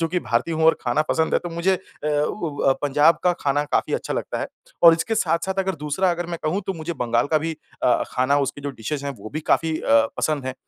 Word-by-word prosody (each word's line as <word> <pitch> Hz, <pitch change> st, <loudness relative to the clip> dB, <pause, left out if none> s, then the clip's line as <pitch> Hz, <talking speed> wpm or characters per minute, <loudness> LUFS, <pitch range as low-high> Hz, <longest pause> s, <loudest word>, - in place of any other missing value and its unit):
चूँकि 170 Hz, +2 st, 0 dB
भारतीय 125 Hz, +8 st, -1 dB
हूँ 160 Hz, 0 st, 0 dB
और 160 Hz, -, +5 dB
खाना 130 Hz, +5 st, +1 dB
पसंद 160 Hz, 0 st, +1 dB
है -, -, +4 dB
तो 175 Hz, -, -5 dB
मुझे 170 Hz, +3 st, +1 dB
अ, -, -, -4 dB, 0.3 s
व 150 Hz, +4 st, -1 dB
व 135 Hz, -, +4 dB
पंजाब 145 Hz, +3 st, +4 dB
का 180 Hz, -, +4 dB
खाना 145 Hz, +1 st, +1 dB
काफ़ी 145 Hz, -, -1 dB
अच्छा -, -, -3 dB
लगता -, -, -3 dB
है। -, -, -2 dB, 0.4 s
और 165 Hz, -1 st, +10 dB
इसके 225 Hz, +7 st, -2 dB
साथ-साथ 170 Hz, +1 st, 0 dB
अगर 190 Hz, 0 st, 0 dB
दूसरा 150 Hz, +5 st, 0 dB
अगर 175 Hz, 0 st, -3 dB
मैं 170 Hz, -1 st, -5 dB
कहूँ, 170 Hz, +6 st, 0 dB
तो 195 Hz, -, -1 dB
मुझे 165 Hz, 0 st, -5 dB
बंगाल 120 Hz, -4 st, 0 dB
का 155 Hz, +1 st, +2 dB
भी 160 Hz, +2 st, -3 dB, 0.3 s
अ, 125 Hz, -, +3 dB
खाना 130 Hz, +3 st, +2 dB
उसकी 145 Hz, -, -6 dB
जो 140 Hz, 0 st, -4 dB
डिशेज़ 140 Hz, +4 st, -5 dB
हैं, 140 Hz, -, -2 dB
वो 110 Hz, +2 st, -9 dB
भी 155 Hz, -, -2 dB
काफ़ी 160 Hz, -1 st, +2 dB
अ, -, -, -8 dB, 0.3 s
पसंद 150 Hz, -4 st, -1 dB
हैं। 130 Hz, -, -3 dB
155 Hz, 245 wpm, -23 LUFS, 140-170 Hz, 0.4 s, और